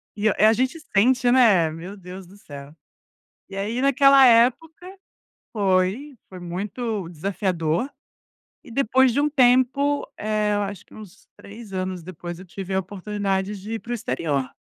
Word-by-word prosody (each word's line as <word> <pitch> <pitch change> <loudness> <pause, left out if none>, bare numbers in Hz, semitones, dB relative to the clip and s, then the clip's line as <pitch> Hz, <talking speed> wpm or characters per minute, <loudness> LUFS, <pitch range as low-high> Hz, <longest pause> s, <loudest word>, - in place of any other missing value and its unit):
E 215 +1 +1
a, - - -1
eh, 215 +2 +5
gente 260 +7 -1 0.2
sente, 245 +3 +3
né. 210 -11 +4
Meu 170 +6 -8
Deus 185 0 -10
do 195 +3 -17
céu. 145 -6 -11 0.8
E 195 - -9
aí 215 +6 -3
naquela 275 0 +6
época, 255 +9 +3 0.7
foi 200 +7 0
foi 185 - -11
muito 200 +3 -4
desafiador. 180 - -2 0.8
E 260 - -14
depois 260 0 +2
de 285 - +1
um 300 - +2
tempo, 270 +1 +2
eh, 215 -1 -1
eu 205 - 0
acho 200 +1 -6
que - - -19
uns 210 -4 -14
3 215 0 -12
anos 185 -1 -4
depois, 175 0 -8
eu 185 - -11
tive 190 +1 -8
a - - +2
oportunidade 195 +1 -3
de 210 +3 -8
ir - - -3
para 240 - -12
o - - 0
exterior. 140 - -2
205 Hz, 165 wpm, -23 LUFS, 185-245 Hz, 0.8 s, naquela